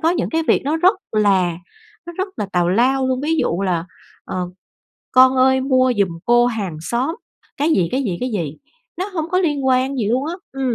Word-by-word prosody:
có 325 - +2
những 355 - -1
cái 325 0 0
việc - - +3
nó 305 +3 0
rất 365 +5 +4 0.2
là 190 -5 +2 0.5
nó 345 - -7
rất 380 +1 -1
là 205 - -2
tào 175 -1 +2
lao 260 +7 +2
luôn, 260 0 0
ví 315 +3 0
dụ 185 - 0
là 175 -3 0 0.4
"Ờ, 180 -1 -4 0.6
con 260 0 +6
ơi, 265 0 +4
mua 255 -1 +2
giùm 200 -2 +3 0.2
cô 240 0 +4
hàng 200 -9 -3
xóm" 245 - -2 0.4
cái 295 +3 +1
gì, 180 - +2
cái 270 +2 0
gì, 190 -8 -2
cái 250 0 -2
gì, 160 -7 -3 0.4
nó 375 - -1
hông 320 +1 -3
có 365 - +2
liên 295 -7 0
quan 260 +1 +2
gì 215 -4 -1
luôn 260 +5 0
á, 335 - -3 0.2
ừm. 265 -3 -1
255 Hz, 220 wpm, -19 LUFS, 200-285 Hz, 0.6 s, con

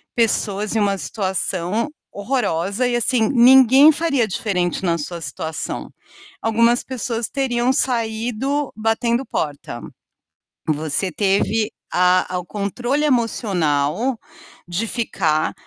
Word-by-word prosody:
pessoas 210 -3 +1
em 220 - +1
uma 200 -1 +1
situação 190 - -2 0.2
horrorosa 205 -1 -1
e, 240 - 0
assim, 235 -1 +2
ninguém 265 +3 +7
faria 295 -6 +1
diferente 180 -3 -2
na 170 -2 +1
sua 170 +3 -5
situação. 160 +1 -5 0.5
Algumas 230 +2 +2
pessoas 235 -3 -3
teriam 255 -2 0
saído 245 +3 -1
batendo 230 +3 0
porta. 140 - -4 0.9
Você 155 +4 0
teve 205 +3 0 0.2
a 180 0 +2
a 180 - 0
o 180 - -8
controle 240 - -2
emocional 215 - 0 0.5
de 190 +6 -2
ficar, 165 -10 0
220 Hz, 105 wpm, -20 LUFS, 180-245 Hz, 0.9 s, ninguém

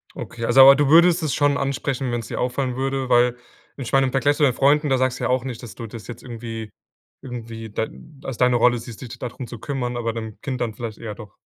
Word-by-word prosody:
Okay, 115 - -5
also, 135 +2 +7
aber 135 +1 +10
du 145 0 +2
würdest 170 +2 +6
es 155 - 0
schon 145 -1 +2
ansprechen, 135 -1 -2
wenn's 120 -2 -3
dir - - -4
auffallen 125 0 -1
würde, 135 0 -2
weil 120 0 +4 0.4
ich 135 -2 -6
meine 135 -1 +4
im 130 - -3
Vergleich 140 +2 +2
zu - - -1
deinen 130 -4 +4
Freunden, 145 +2 +3
da 135 - +3
sagst 130 0 0
du - - -2
ja - - 0
auch 130 0 +1
nicht, 125 -2 -6
dass 120 - -9
du 115 - -7
das 110 0 -10
jetzt 120 -1 -9
irgendwie 115 -3 -7 0.5
irgendwie 115 -3 -7
da 110 +2 -1 0.4
als 135 -4 -5
deine 125 -1 +4
Rolle 120 0 +4
siehst, 115 0 -10
s 125 - -7
dich - - -10
dadrum 125 0 -6
zu 120 - -9
kümmern, 125 -2 -3
aber 115 -1 -2
beim 110 -2 -7
Kind 130 -2 -4
dann 115 -3 -1
vielleicht 110 -2 -6
eher 110 -3 -6
doch. 105 -2 -12
125 Hz, 255 wpm, -22 LUFS, 115-135 Hz, 0.5 s, aber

